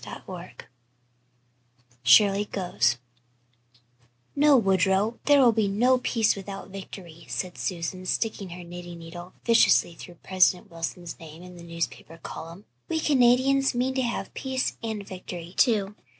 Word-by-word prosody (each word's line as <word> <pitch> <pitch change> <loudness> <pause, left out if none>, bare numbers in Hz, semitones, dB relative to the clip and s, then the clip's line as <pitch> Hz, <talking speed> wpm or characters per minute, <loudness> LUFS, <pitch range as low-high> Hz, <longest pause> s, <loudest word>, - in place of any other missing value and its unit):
CHAPTER - - -9
XXV - - -9 1.4
SHIRLEY 200 - +5
GOES 120 - 0 1.4
"No, 290 -1 +6
Woodrow, 195 +1 +2
there 290 -1 +6
will 250 -3 +6
be 220 -2 +1
no 245 +6 +3
peace 225 -3 +1
without 195 0 -8
victory," 180 -4 -10
said 180 -2 -4
Susan, 185 +1 -4
sticking 210 -3 -2
her 175 +1 -8
knitting 175 0 -9
needle 175 +2 -10
viciously 230 -6 +4
through 175 +1 -12
President 185 -1 +2
Wilson's 170 +1 -6
name 160 +1 -11
in 180 0 -12
the 175 - -12
newspaper 170 -1 -5
column. 170 +3 -9 0.2
"We 320 - 0
Canadians 270 -1 +3
mean 255 +2 0
to 260 - 0
have 240 -2 -3
peace 260 -1 -2
and 220 -3 -5
victory, 180 -2 -8
too. 210 -5 +2
195 Hz, 135 wpm, -26 LUFS, 175-235 Hz, 1.4 s, No